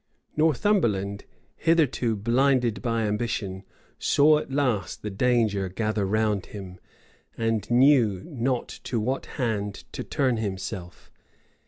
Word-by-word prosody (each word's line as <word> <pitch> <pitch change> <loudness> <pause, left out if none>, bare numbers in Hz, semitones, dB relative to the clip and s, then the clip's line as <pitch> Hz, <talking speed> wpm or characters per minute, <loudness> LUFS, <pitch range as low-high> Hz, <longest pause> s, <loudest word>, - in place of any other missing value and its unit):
Northumberland, 125 - +1 0.3
hitherto 150 -8 +2
blinded 120 +2 +2
by 115 -2 0
ambition, 105 -3 -2 0.4
saw 150 +1 +4
at 135 - -8
last 125 -9 -1
the 105 - -3
danger 105 -3 +1
gather 105 +1 -1
round 105 -1 0
him, 95 -3 -9 0.6
and 115 -3 -1
knew 120 -6 +4
not 130 -5 -1 0.2
to 120 - -1
what 130 +5 -2
hand 105 -5 -2
to - - -5
turn 130 -4 0
himself. 95 -3 -5
115 Hz, 115 wpm, -26 LUFS, 100-130 Hz, 0.6 s, saw